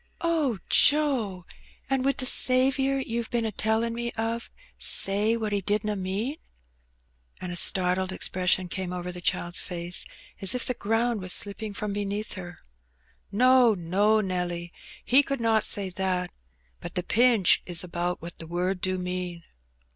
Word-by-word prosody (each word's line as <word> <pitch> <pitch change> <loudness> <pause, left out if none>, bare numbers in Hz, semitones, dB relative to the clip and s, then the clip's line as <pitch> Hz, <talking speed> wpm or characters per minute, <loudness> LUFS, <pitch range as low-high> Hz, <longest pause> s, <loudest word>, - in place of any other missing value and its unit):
" - - -36 0.2
Oh, 265 -8 0
Joe! 255 - +3 0.4
And 270 -1 0
would 275 +1 +1
the 260 - -2
Saviour 265 +2 +3
you've 235 -3 -3
been 235 -1 -1
a 220 - -2
telUn' 220 +2 0
me 235 0 -3
of 230 +1 -3 0.3
say 210 +4 +3
what 220 -2 -3
He 200 -1 0
didna 210 +2 -1
mean? 200 +9 -3 0.5
" 60 +1 -35
And 180 -1 -6
a - - -5
startled 185 +1 +2
expression 185 0 0
came 185 0 -4
over 180 0 -5
the 180 0 -8
child's 175 0 -1
face, 175 0 -3 0.3
as 195 +5 +3
if 250 - -1
the 250 - -1
ground 225 0 -1
was 185 0 +2
slipping 205 +1 -1
from 210 -1 -4
beneath 205 +1 -3
her. 175 -3 -9 0.7
"No> 250 +1 +5
no, 200 +5 +2
Nelly, 180 -2 -3 0.3
He 260 +3 +5
could 275 -1 -4
not 225 -1 +2
say 195 -2 0
that; 180 -1 -2 0.5
but 175 - -8
t]:ie 180 - -1
pinch 230 -5 +4
is 175 -1 +2
about 175 -1 -3
what 170 0 -9
the 165 - -7
word 180 +2 -2
do 185 0 0
mean." 180 -1 -4
200 Hz, 165 wpm, -26 LUFS, 180-230 Hz, 0.7 s, No>